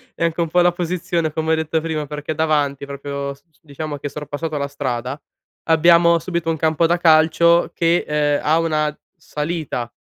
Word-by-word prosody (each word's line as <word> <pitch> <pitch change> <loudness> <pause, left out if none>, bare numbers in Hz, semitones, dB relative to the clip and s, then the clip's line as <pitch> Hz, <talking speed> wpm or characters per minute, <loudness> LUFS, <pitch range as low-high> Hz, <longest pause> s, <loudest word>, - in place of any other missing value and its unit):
è - - -3
anche 170 +1 -1
un 165 - -1
po' 180 - +2
la 175 0 +4
posizione, 175 -2 -2
come 160 0 0
ho - - +4
detto 160 0 -1
prima, 155 -2 -3
perché 150 +1 -5
davanti 145 -3 0
proprio 140 0 -5
s 140 - -22
s 155 - -33
diciamo 150 -1 -6
che 140 +1 -5
sorpassato 150 +1 -5
la 140 0 -2
strada, 130 -1 -4 0.5
abbiamo 170 +1 +5
subito 170 -1 -3
un 160 - 0
campo 160 +1 +1
da 175 +1 +2
calcio 170 +1 +4
che, 170 +1 +2
ehm, 150 -1 +1
ha 160 +2 +3
una 155 -2 0 0.2
salita, 150 -6 -4
155 Hz, 185 wpm, -20 LUFS, 145-165 Hz, 0.5 s, abbiamo